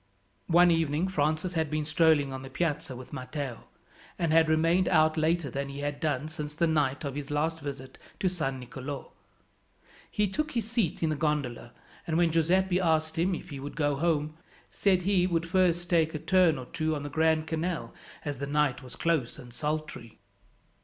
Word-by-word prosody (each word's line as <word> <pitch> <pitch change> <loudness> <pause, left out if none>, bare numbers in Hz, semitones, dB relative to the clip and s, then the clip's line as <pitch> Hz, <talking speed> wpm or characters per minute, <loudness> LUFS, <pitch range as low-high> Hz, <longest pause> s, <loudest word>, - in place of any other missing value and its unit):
One 175 +1 +6
evening 165 +1 +1
Francis 155 +1 0
had 160 -3 0
been 155 0 -1
strolling 155 -3 +3
on 130 - -5
the 135 - -9
Piazza 145 -3 -2
with 130 +3 -10
Matteo, 130 -2 -5 0.5
and 165 -2 +1
had 160 -1 +5
remained 165 +4 +3
out 155 -2 +4
later 160 -2 +1
than 140 +2 -3
he 140 +1 -6
had 145 0 -3
done 150 -2 -1
since 150 -1 -6
the 170 - +2
night 150 -3 +1
of 140 - -3
his 145 0 -5
last 160 +3 0
visit 135 -3 -7 0.2
to 190 - +1
San 155 -8 -2
Nicolo. 130 +2 -7 1.0
He 210 0 +1
took 300 +10 -2
his 235 -3 -1
seat 225 -9 -1
in 160 - +2
the - - 0
gondola, 140 -6 -2 0.4
and 160 -1 0
when 170 -1 +3
Giuseppi 180 +3 +2
asked 160 -2 +1
him 180 +2 +2
if 175 - -9
he 140 - -6
would 145 +2 -7
go 145 -2 +1
home, 155 0 0 0.3
said 185 -3 +2
he 185 -1 +3
would 170 -2 0
first 175 -1 +2
take 165 -2 +2
a - - 0
turn 165 0 +3
or 130 - -6
two 155 +4 -1
on 145 - -4
the 145 - -5
Grand 160 +1 +2
Canal 165 +2 -3 0.3
as 145 -3 -3
the 140 - -3
night 145 -3 +1
was 125 -2 -11
close 160 -8 0
and 120 -2 -12
sultry. 150 -3 -4
155 Hz, 195 wpm, -29 LUFS, 145-170 Hz, 1.0 s, One